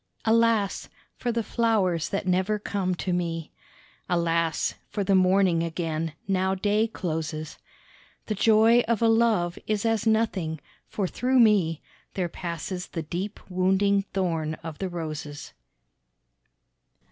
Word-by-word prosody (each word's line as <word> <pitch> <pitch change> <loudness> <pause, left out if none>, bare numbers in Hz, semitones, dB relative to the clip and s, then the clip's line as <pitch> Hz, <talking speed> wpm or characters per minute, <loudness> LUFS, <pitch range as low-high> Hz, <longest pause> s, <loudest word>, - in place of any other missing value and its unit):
Alas! 225 -3 +2 0.3
for 245 - -2
the 230 0 -1
flowers 205 -9 +1
that 200 - -2
never 185 +3 +1
come 195 -3 -2
to 180 +1 -2
me; 165 -2 -2 0.6
Alas! 170 -2 +1 0.2
for 205 -1 -2
the 195 - +1
morning 185 -2 +4
again, 165 -1 -2
now 190 0 +1
day 210 +3 +1
closes; 155 -6 -4 0.7
The 215 - -2
joy 220 +3 +5
of 230 -1 +1
a - - +5
love 225 -6 +2
is 215 0 0
as 225 -1 +1
nothing, 200 -8 +1 0.3
for 200 - -2
through 255 +6 +1
me 195 -9 +3 0.3
There 180 -3 -1
passes 180 +2 -5
the 165 - -5
deep 180 +6 -4
wounding 190 +2 +2
thorn 165 -5 -1
of 160 -2 -7
the 190 - -2
roses. 155 -4 -6
185 Hz, 130 wpm, -26 LUFS, 165-215 Hz, 0.7 s, joy